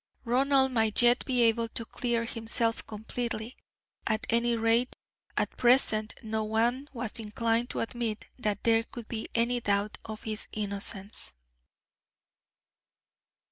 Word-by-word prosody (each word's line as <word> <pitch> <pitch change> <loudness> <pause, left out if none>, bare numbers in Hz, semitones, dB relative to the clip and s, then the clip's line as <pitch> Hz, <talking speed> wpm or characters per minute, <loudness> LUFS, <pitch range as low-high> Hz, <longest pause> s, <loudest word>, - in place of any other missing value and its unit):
Ronald 265 +2 +3
might 225 -1 +3
yet 240 +1 +5
be 250 -3 +3
able 230 0 +3
to 230 0 -6
clear 235 -1 -1
himself 230 0 +1
completely. 225 +2 -4 0.5
At 220 -1 0
any 235 +1 +3
rate, 230 +2 +2 0.4
at - - 0
present 235 -3 +3
no 220 0 -1
one 235 +6 0
was 235 -2 -4
inclined 230 +2 0
to - - -2
admit 230 -2 -3
that 210 -4 -1
there 225 -1 +4
could 230 0 -10
be 220 -2 -4
any 240 +1 +2
doubt 205 -1 0
of 215 -1 -8
his 215 -1 -4
innocence. 200 - -3
230 Hz, 130 wpm, -29 LUFS, 220-240 Hz, 0.5 s, yet